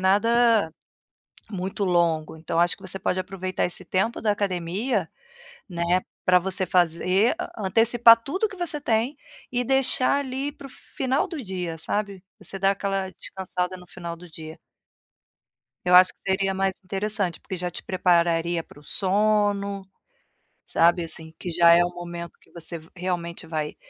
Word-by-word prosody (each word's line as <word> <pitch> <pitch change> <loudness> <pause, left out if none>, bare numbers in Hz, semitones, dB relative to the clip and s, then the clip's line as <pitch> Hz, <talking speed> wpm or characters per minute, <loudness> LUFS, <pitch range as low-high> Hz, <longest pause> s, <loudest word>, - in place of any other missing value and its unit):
nada 220 0 +3 0.8
muito 195 0 -3
longo. 170 -4 +1
Então, 165 +1 -1
acho 175 +1 +2
que - - -20
você 190 0 -6
pode 180 - 0
aproveitar 185 0 -3
esse 180 +1 -4
tempo 190 +6 0
da 215 - +1
academia, 195 +3 -1 0.6
né, 175 0 0 0.2
pra 180 0 +5
você 190 +1 0
fazer 180 - +2 0.2
antecipar 230 +3 +5
tudo 370 - -1
que 385 - -10
você 340 -4 -1
tem 235 +2 0 0.3
e 245 0 0
deixar, 265 +1 +2
ali, 270 +1 -3
para 285 -1 -11
o - - -16
final 260 +1 -2
do 325 -5 -6
dia, 180 -6 -4
sabe, 200 +3 -3 0.2
você 195 - -7
dá 195 +1 +4
aquela 195 -1 -2
descansada 185 -1 -4
no 180 0 -15
final 170 -1 -7
do 175 +1 -14
dia. 160 0 -10 1.3
Eu 180 0 +3
acho 185 0 +7
que - - -34
seria 195 0 0
mais 190 0 0
interessante, 195 -1 -2
porque 190 - -6
já 180 0 -2
te - - -7
prepararia 170 -2 +2
para 145 - -17
o 145 - -17
sono, 200 +1 +1 0.8
sabe. 170 +1 +3
Assim, 160 -1 -7
que 180 - -5
já 170 0 +6
é 175 - +5
o 175 - -1
momento 175 -1 -8
que - - -25
você, 170 0 -6 0.2
realmente, 175 -2 -3
vai 155 -2 -3
185 Hz, 160 wpm, -25 LUFS, 175-210 Hz, 1.3 s, acho